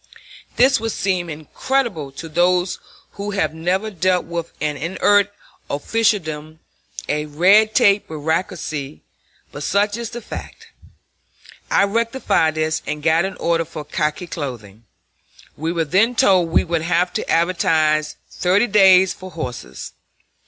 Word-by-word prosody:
This 265 +1 +4
would 225 0 -3
seem 185 -3 -1
incredible 160 - -2
to 165 +4 -8
those 175 +3 +1 0.3
who 200 +1 -6
have 155 -4 0
never 185 +6 -1
dealt 185 0 +1
with 170 -1 -5
an 150 -1 -1
inert 200 +6 +2 0.4
officialdom, 155 -4 -1 0.5
a 150 0 -1
red 195 +8 +4
tape 205 -5 +4
bureaucracy, 155 - -3 0.5
but 145 - -8
such 205 +6 +1
is 235 -2 -5
the 240 - -7
fact. 230 - -9 1.0
I - - +4
rectified 205 - +1
this 155 0 -1
and 150 0 -4
got 165 +2 +3
an 195 - -5
order 165 0 0
for 155 -2 -8
khaki 150 +3 -2
clothing. 120 - -7 0.7
We 160 +3 -3
were 165 -2 -1
then 205 +10 +2
told 185 -6 +4
we 165 - +3
would 170 -1 -1
have 175 +2 0
to - - -3
advertise 160 -3 +1
thirty 190 +5 +1
days 190 -4 +5
for 185 - -10
horses. 140 -8 -7
175 Hz, 135 wpm, -20 LUFS, 155-200 Hz, 1.0 s, days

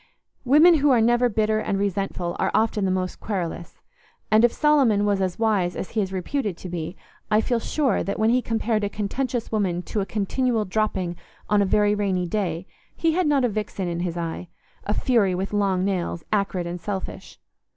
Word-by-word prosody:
Women 310 +6 +6
who 290 +1 +3
are 250 -3 +5
never 240 +2 +3
bitter 215 0 +1
and 200 - -1
resentful 195 -3 -2
are - - +1
often 215 -2 +1
the - - +1
most 185 -1 -2
querulous; 175 -4 -4 0.5
and 215 +1 +5
if 240 - +5
Solomon 270 -9 +3
was 200 -1 +1
as 185 -2 -1
wise 205 -6 +1
as - - -5
he 220 - 0
is 190 -2 -3
reputed 195 - -2
to 180 - -8
be, 170 +1 -5 0.3
I 215 0 +4
feel 235 +1 0
sure 270 -1 0
that 200 - -3
when 220 +1 +3
he 250 +1 +3
compared 225 -2 -1
a 205 - 0
contentious 235 +4 -3
woman 185 -5 0
to 210 - -2
a 195 - -3
continual 220 +2 0
dropping 185 -4 -1 0.3
on 210 -1 +4
a - - +3
very 205 +1 +3
rainy 195 -3 0
day, 175 -3 -2 0.3
he 330 - +1
had 350 0 +1
not 280 -3 +3
a - - +3
vixen 205 -3 -3
in 170 0 -3
his 175 -1 -3
eye—a 170 +4 -6
fury 215 -8 +2
with 190 +3 -3
long 195 -2 +1
nails, 175 -4 -2
acrid 195 -3 0
and 175 0 -5
selfish. 190 +2 -6
205 Hz, 195 wpm, -24 LUFS, 185-225 Hz, 0.5 s, Women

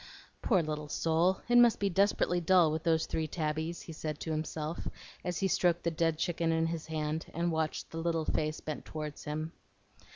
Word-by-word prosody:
"Poor 190 -7 +3
little 150 -1 -3
soul! 165 +5 +2
it 240 0 +6
must 240 -2 +6
be 200 - +2
desperately 190 -2 +2
dull 175 -2 +5
with 155 0 -1
those 160 -1 +2
three 160 -1 -2
tabbies," 155 +1 -2
he 165 - -8
said 155 -1 -4
to 160 - -4
himself, 155 +1 -3 0.4
as 180 -1 -2
he 195 - +3
stroked 175 -2 +2
the 170 - +1
dead 165 0 +1
chicken 165 0 0
in 160 0 +2
his 165 -1 -3
hand, 155 0 -2
and 170 +1 +1
watched 160 -1 -2
the 165 - -4
little 165 -1 0
face 155 0 -1
bent 155 -1 -5
toward 150 -1 -6
him. 155 +1 -4
160 Hz, 195 wpm, -32 LUFS, 155-170 Hz, 0.4 s, it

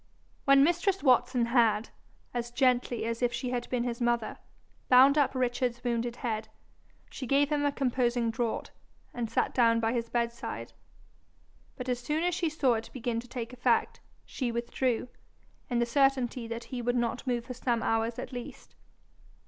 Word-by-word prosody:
When 275 0 +7
mistress 355 +5 +1
Watson 250 -2 +3
had, 230 -2 +2 0.4
as 240 -1 -3
gently 245 -2 +1
as 230 +1 -3
if 245 -1 +2
she 245 +1 -3
had 245 -1 -3
been 250 -2 0
his 240 0 -3
mother, 240 -1 0 0.5
bound 260 +3 +7
up 285 -3 +2
Richard's 245 -1 -1
wounded 240 -1 -1
head, 220 -3 -3 0.6
she 260 - -6
gave 285 +3 +3
him 295 -1 +1
a - - +1
composing 245 -3 0
draught, 235 -1 -2 0.4
and 235 -2 -3
sat 230 - 0
down 230 -2 +4
by 225 +1 0
his 235 -1 -2
bedside. 235 0 -3 1.0
But 250 - -6
as 250 -1 0
soon 300 +6 -1
as 355 0 +1
she 335 -1 0
saw 285 -5 +2
it 225 0 -4
begin 240 -2 -2
to 240 - -9
take 240 -1 -6
effect, 245 -2 +1 0.3
she 250 -3 -3
withdrew, 235 +1 -1 0.6
in 245 - 0
the 235 - +2
certainty 255 -2 +1
that 230 +1 -5
he 250 -1 -5
would 245 +1 0
not 240 +1 -1
move 240 -2 -1
for 250 - -6
some 240 -2 -1
hours 225 +1 0
at - - -6
least. 245 -1 -8
245 Hz, 175 wpm, -29 LUFS, 235-260 Hz, 1.0 s, When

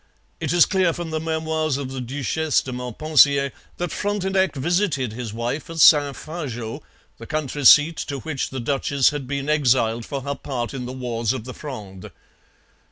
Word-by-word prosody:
It - - -2
is 175 -1 +6
clear 185 -4 +1
from 170 -1 -6
the 155 - -1
Memoirs 160 -2 -1
of 135 -2 -5
the 135 -1 -5
Duchesse 145 +4 -1
de 130 - -6
Montpensier 140 +2 +3 0.3
that 175 -2 -3
Frontenac 190 -3 0
visited 150 - 0
his 120 -2 -5
wife 120 +8 -4
at 165 - -7
Saint 145 -3 +6
Fargeau, 130 -9 -6 0.4
the - - -9
country 150 -1 -3
seat 150 +5 +7
to 140 - -4
which 150 -4 -3
the 130 - -5
duchess 135 +2 +1
had 145 -3 -5
been 140 +1 -3
exiled 125 -6 +2
for 140 +3 -5
her 140 +1 -2
part 130 -4 -4
in 125 -2 -5
the - - -5
wars 120 -2 -2
of 130 -4 -5
the 130 +2 -8
Fronde. 105 -11 -8
140 Hz, 175 wpm, -22 LUFS, 125-160 Hz, 0.4 s, seat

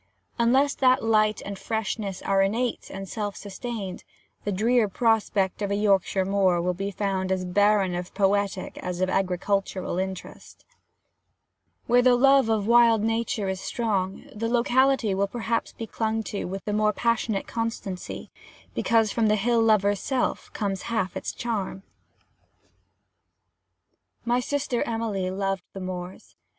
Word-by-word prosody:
Unless 265 +5 +3
that 255 -2 +4
light 215 -1 +2
and 200 -1 -6
freshness 215 -3 -3
are 195 0 +2
innate 225 +5 -1
and 195 0 -7
self 205 0 -4
sustained, 205 -1 -6 0.4
the 205 - 0
drear 220 +3 +2
prospect 210 -3 +1
of 200 - -1
a 200 - 0
Yorkshire 195 -2 +2
moor 190 -2 +2
will 180 +1 0
be 195 +3 -3
found 190 -1 -2
as 185 -1 0
barren 205 0 +3
of 175 +1 -4
poetic 200 -1 0
as 180 -1 -4
of 185 0 +1
agricultural 190 0 -1
interest: 190 -1 -7 1.2
where 245 +1 +4
the 250 0 +5
love 270 -1 +5
of 215 -2 +1
wild 230 -1 +5
nature 225 -2 -1
is 190 0 -3
strong, 200 -5 -2
the 230 +2 -2
locality 245 -1 +3
will 200 +1 +1
perhaps 230 +1 -2
be 225 - -7
clung 220 0 -2
to 205 - -4
with 190 +2 -6
the 210 - -2
more 210 0 +2
passionate 230 -2 0
constancy, 225 -5 -5 0.4
because 225 -3 +2
from 225 -2 +1
the 210 - +4
hill 230 +3 +2
lover's 205 -3 +3
self 265 -2 -2
comes 195 -2 -2
half 220 -5 -1
its - - -3
charm. 205 -5 -4 2.4
My 240 +1 +2
sister 270 -1 -1
Emily 220 -5 -2
loved 195 -1 -2
the 195 - -7
moors. 185 0 -7
205 Hz, 145 wpm, -26 LUFS, 195-230 Hz, 2.4 s, the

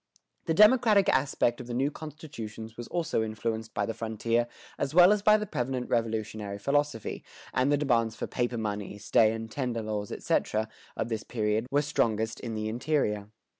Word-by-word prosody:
The 160 - +1
democratic 215 -1 +6
aspect 125 -3 +1
of 120 - -10
the 120 - -4
new 135 +4 +1
constitutions 115 -9 -8
was 120 0 -7
also 165 -8 -1
influenced 110 0 -3
by - - +1
the 115 - -3
frontier 115 +1 -1 0.3
as 140 +3 -2
well 180 +2 +8
as 210 -1 +2
by 215 +1 +6
the 210 - -3
prevalent 125 - -3
Revolutionary 110 -3 -1
philosophy; 140 0 -1 0.3
and 130 +3 +2
the 145 - +4
demands 115 -6 +1
for - - -3
paper 120 -1 -2
money, 105 -2 -3
stay 110 +1 +3
and 115 0 -5
tender 125 -4 -2
laws, 105 -1 -3
etc., 110 0 0 0.3
of 115 - -2
this 110 -2 -2
period 110 0 -1
were 145 +1 +2
strongest 110 -5 0
in 115 -2 -5
the 110 0 -2
interior. 110 -4 -1
115 Hz, 175 wpm, -29 LUFS, 110-145 Hz, 0.3 s, well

